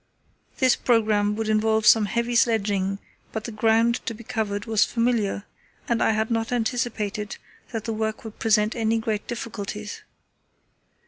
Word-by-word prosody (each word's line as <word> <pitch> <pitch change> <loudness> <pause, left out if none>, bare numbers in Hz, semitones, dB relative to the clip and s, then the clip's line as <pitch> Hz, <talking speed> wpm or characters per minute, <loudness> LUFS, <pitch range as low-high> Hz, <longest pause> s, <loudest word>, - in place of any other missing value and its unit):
This 260 -2 +4
programme 215 -3 +2
would 220 0 -2
involve 220 0 +2
some 220 -1 +7
heavy 235 +3 -1
sledging, 200 -4 +2 0.3
but 220 - -4
the 235 - -5
ground 225 +2 +2
to 230 - -2
be 235 - -11
covered 205 -2 -2
was 220 -2 +3
familiar, 230 -4 0 0.4
and 235 -1 +1
I - - +4
had 220 +1 0
not 225 +1 0
anticipated 220 -3 -2 0.3
that 225 -3 -3
the 225 - -3
work 220 0 -2
would 220 -2 -10
present 215 -1 +2
any 225 -1 +1
great 220 -2 -2
difficulties. 210 -3 -5
220 Hz, 150 wpm, -24 LUFS, 210-230 Hz, 0.4 s, some